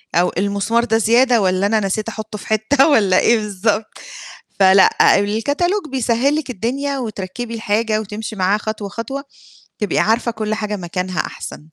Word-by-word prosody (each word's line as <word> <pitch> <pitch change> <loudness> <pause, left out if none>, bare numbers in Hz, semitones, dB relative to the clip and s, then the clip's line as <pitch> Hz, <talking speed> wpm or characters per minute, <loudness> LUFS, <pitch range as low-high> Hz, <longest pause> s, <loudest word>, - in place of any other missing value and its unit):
أو 175 +2 +3
المسمار 200 +4 0
ده 225 -2 +1
زيادة 235 +2 +3
والَّا 185 0 +1
أنا 220 +1 +2
نسيت 210 +2 -2
أحُطُّه 220 -1 -7
في - - -11
حتّة 240 +7 +3
والَّا 200 -11 +4
إيه 235 - +4
بالضبط. 210 +1 -1 0.7
فلأ، 190 +1 +5
الكتالوج 285 - 0
بيسهِّل 255 +2 +1
لِك 310 -3 -3
الدنيا 265 +5 -2
وتركِّبي 225 0 -5
الحاجة، 220 0 0
وتمشي 215 +1 -6
معاه 195 +1 +1
خطوة، 215 -1 -5
خطوة، 235 +7 -5 0.6
تبقي 210 - -1
عارفة 230 +2 +1
كُلّ 215 -1 -3
حاجة 210 -1 -3
مكانها 180 -2 -3
أحسن. - - -6
220 Hz, 155 wpm, -18 LUFS, 200-235 Hz, 0.7 s, فلأ